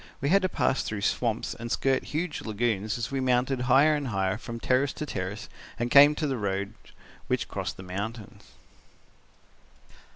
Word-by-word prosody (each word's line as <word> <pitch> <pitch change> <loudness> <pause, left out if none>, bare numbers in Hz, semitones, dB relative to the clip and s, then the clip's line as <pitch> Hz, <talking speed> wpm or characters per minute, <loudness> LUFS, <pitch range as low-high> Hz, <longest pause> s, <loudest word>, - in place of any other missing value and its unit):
We 140 - -1
had 195 +4 +5
to 185 - 0
pass 135 - +1
through 105 -2 -4
swamps 115 +2 0
and 115 0 -7
skirt 135 -1 +1
huge 155 +1 -3
lagoons 110 -1 -1
as 120 +1 -4
we 135 - -1
mounted 125 0 +1
higher 140 +5 +6
and 145 -2 -2
higher 95 -2 -1
from 115 +2 -7
terrace 130 +3 +1
to 150 - -5
terrace 100 -2 -5 0.3
and 120 0 -2
came 145 +1 +8
to 155 - -2
the 135 -3 -1
roads 100 0 -2 0.5
which - - 0
crossed - - -4
the 95 - -9
mountains. 105 +4 -6
120 Hz, 170 wpm, -27 LUFS, 105-140 Hz, 0.5 s, came